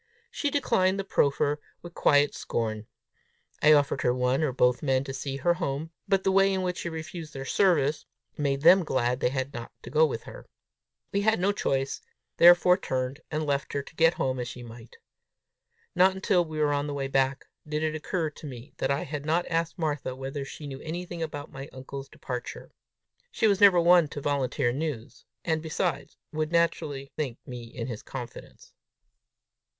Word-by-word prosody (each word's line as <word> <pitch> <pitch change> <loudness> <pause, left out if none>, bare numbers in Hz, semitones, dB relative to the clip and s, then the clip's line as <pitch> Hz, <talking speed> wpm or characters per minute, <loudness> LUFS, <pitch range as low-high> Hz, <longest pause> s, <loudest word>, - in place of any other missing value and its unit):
She 295 -10 -1
declined 215 -10 +2
the 195 - -2
proffer 145 -4 +1 0.2
with 175 -1 -9
quiet 145 -3 +3
scorn. 110 -2 -3 0.7
I 155 +1 +7
offered 140 -2 +2
her 125 0 +2
one 125 +3 +1
or 155 -4 +1
both 125 -1 +2
men 135 -2 +1
to 135 - -6
see 135 0 -4
her 175 +6 +2
home, 160 -2 -3 0.2
but 195 -1 +2
the 190 - +2
way 195 +1 +4
in 190 -1 -1
which 180 -1 -2
she 170 - -3
refused 160 -1 -7
their 135 0 -5
service, 155 -3 +2 0.3
made 140 -2 -1
them 180 +4 +7
glad 125 -4 0
they 125 - +2
had 130 +1 -3
not 115 -1 -7
to - - -9
go 155 +3 +4
with 115 -5 -5
her. - - -11 0.6
We 200 - +1
had 220 0 +2
no 195 +3 +2
choice, 135 -8 -1 0.4
therefore 175 +1 +7
turned 130 -5 -3
and 155 0 -2
left 140 -1 -1
her 140 - -1
to 155 - -15
get 165 +1 +4
home 130 -1 -1
as 120 - -3
she 120 0 -8
might. 115 0 -12 1.0
Not 185 +1 +4
until 190 -2 +2
we 155 -2 -7
were 150 -1 +2
on 145 0 -1
the 145 - -4
way 135 -1 -2
back, 135 0 +1 0.2
did 150 +1 -2
it 155 -1 0
occur 155 +1 -2
to 150 - -10
me 125 -1 -10
that - - -1
I 140 +1 0
had 145 -1 -5
not 165 +3 +1
asked 165 +2 -1
Martha 145 -6 -2
whether 135 +2 -5
she 145 +2 -9
knew 135 -2 -7
anything 175 +1 -5
about 145 -3 -5
my 135 +1 -8
uncle's 135 +1 -8
departure. 125 -2 -7 0.6
She 230 - 0
was 200 -2 +3
never 195 -3 +8
one 170 -1 +6
to 145 - -7
volunteer 135 -4 0
news, 140 -5 -5 0.2
and, 160 -2 0
besides, 165 +2 -2 0.2
would 155 0 -1
naturally 155 -5 0
think 135 -6 -2
me 125 -2 -7
in 115 0 -6
his 115 -5 -6
confidence! 120 -3 -9
145 Hz, 190 wpm, -27 LUFS, 135-170 Hz, 1.0 s, never